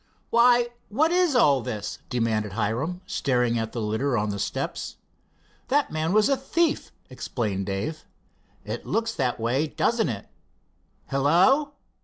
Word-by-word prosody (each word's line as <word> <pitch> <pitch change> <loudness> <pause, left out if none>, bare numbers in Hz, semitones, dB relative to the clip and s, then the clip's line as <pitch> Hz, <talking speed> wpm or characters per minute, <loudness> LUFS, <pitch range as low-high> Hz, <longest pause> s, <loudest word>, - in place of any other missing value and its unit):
"Why, 240 0 +5 0.2
what 305 +10 +2
is 355 -5 +3
all 140 - +5
this?" 105 -2 -5
demanded 110 -5 0
Hiram, 120 - -2
staring 125 -3 +1
at 110 0 -3
the 120 - -4
litter 115 +5 0
on 105 -1 0
the 100 - -4
steps. - - -3 0.7
"That 285 +2 +1
man 155 +1 -1
was 210 +1 +4
a 275 - +3
thief," 305 +5 0 0.2
explained 105 -6 -3
Dave. 100 +11 -4 0.6
"It - - -5
looks 225 0 0
that 130 - -1
way, 125 +7 +1
doesn't 225 - +1
it? 105 -4 -5 0.8
Hello!" 180 - +3
140 Hz, 140 wpm, -25 LUFS, -, 0.8 s, Why